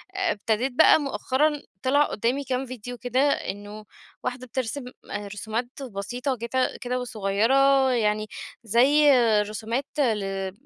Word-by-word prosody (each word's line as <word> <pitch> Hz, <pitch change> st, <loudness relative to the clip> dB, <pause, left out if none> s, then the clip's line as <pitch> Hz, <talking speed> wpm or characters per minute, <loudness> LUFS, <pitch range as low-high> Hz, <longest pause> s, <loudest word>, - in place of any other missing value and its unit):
ابتديت 255 Hz, -, 0 dB
بقى 315 Hz, +5 st, +6 dB
مؤخرًا 290 Hz, +1 st, 0 dB, 0.2 s
طلع 285 Hz, +3 st, +4 dB
قدامي 250 Hz, +3 st, -1 dB
كام 265 Hz, 0 st, -2 dB
فيديو 245 Hz, -1 st, -8 dB
كده، 245 Hz, +1 st, -1 dB
إنه 205 Hz, -3 st, -4 dB, 0.4 s
واحدة 250 Hz, 0 st, -4 dB
بترسم 260 Hz, +2 st, -3 dB, 0.5 s
رسومات 220 Hz, +3 st, -3 dB, 0.2 s
بسيطة 245 Hz, +4 st, -4 dB
وجت 235 Hz, +1 st, -3 dB, 0.2 s
كده 250 Hz, +1 st, -2 dB
وصغيرة 250 Hz, +5 st, +2 dB
يعني 215 Hz, -3 st, +1 dB, 0.4 s
زي 275 Hz, +7 st, +5 dB, 0.3 s
رسومات 220 Hz, +5 st, -3 dB
ل 225 Hz, -7 st, +2 dB
أ 195 Hz, -1 st, -3 dB
245 Hz, 120 wpm, -25 LUFS, 215-270 Hz, 0.5 s, بقى